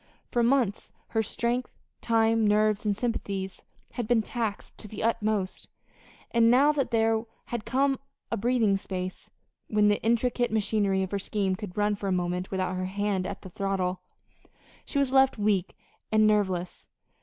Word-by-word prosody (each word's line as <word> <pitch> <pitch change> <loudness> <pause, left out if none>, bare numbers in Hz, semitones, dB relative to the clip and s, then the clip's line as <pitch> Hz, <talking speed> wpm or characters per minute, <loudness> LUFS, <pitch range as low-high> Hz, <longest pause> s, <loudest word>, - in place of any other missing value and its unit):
For 240 - +2
months 235 -4 +1 0.2
her 225 - +1
strength, 235 +3 -2 0.2
time, 225 -1 +3
nerves, 210 0 +2
and 205 -1 +1
sympathies 200 -5 -3 0.3
had 240 -3 -4
been 230 -2 +3
taxed 225 -3 -4
to 215 - -8
the 210 +1 -6
utmost; 215 -4 -1 0.6
and 230 -1 +4
now 270 +5 +6
that 285 -3 -1
there 225 -1 +2 0.2
had 240 -3 -4
come 270 +1 +1 0.3
a - - +1
breathing 225 -3 +2
space, 185 -1 -6 0.4
when 210 -1 +3
the 205 - +1
intricate 240 +2 +1
machinery 205 -3 +1
of 190 - -5
her 200 - -1
scheme 195 -1 -1
could 200 -2 -8
run 210 0 +2
for 200 -1 -4
a - - 0
moment 180 0 -1
without 185 -1 -1
her 185 - -2
hand 195 -1 -1
at - - -7
the 190 - -8
throttle, 190 -1 -1 0.8
she - - -4
was 275 -2 +2
left 265 -1 +4
weak 205 -3 0 0.3
and 215 0 +5
nerveless. 190 -4 0
210 Hz, 165 wpm, -27 LUFS, 195-230 Hz, 0.8 s, now